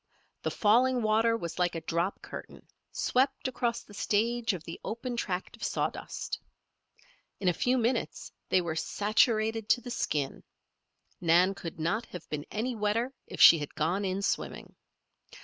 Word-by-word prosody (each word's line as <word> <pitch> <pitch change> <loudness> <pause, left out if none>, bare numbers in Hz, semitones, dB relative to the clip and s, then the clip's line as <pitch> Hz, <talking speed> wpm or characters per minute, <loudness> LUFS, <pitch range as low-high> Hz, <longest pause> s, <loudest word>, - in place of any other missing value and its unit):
The - - -1
falling 245 +3 +3
water 225 +2 +3
was 170 -5 -6
like 175 -1 +1
a 165 - -3
drop 170 +4 -1
curtain, - - -9 0.3
swept 265 +1 +1
across 240 -2 -1
the 205 - -16
stage 230 +3 +1
of 180 -5 -5
the 165 - -8
open 240 +2 -4
tract 185 -5 -3
of - - -11
sawdust. - - -3 1.0
In 190 - -2
a 180 - +5
few 250 +9 +1
minutes 240 +1 -1 0.2
they 185 - +4
were 170 -2 -3
saturated 215 +3 +1
to 245 - +4
the 245 - -7
skin. 150 - -1 0.8
Nan 175 +3 +4
could 165 -4 -8
not 190 +9 -1
have 180 - -9
been 150 -1 -4
any 235 +4 -2
wetter 225 +5 0
if - - -8
she 165 - +10
had 145 - -6
gone 170 +6 0
in 195 +1 -1
swimming. - - -2
210 Hz, 160 wpm, -30 LUFS, 175-235 Hz, 1.0 s, she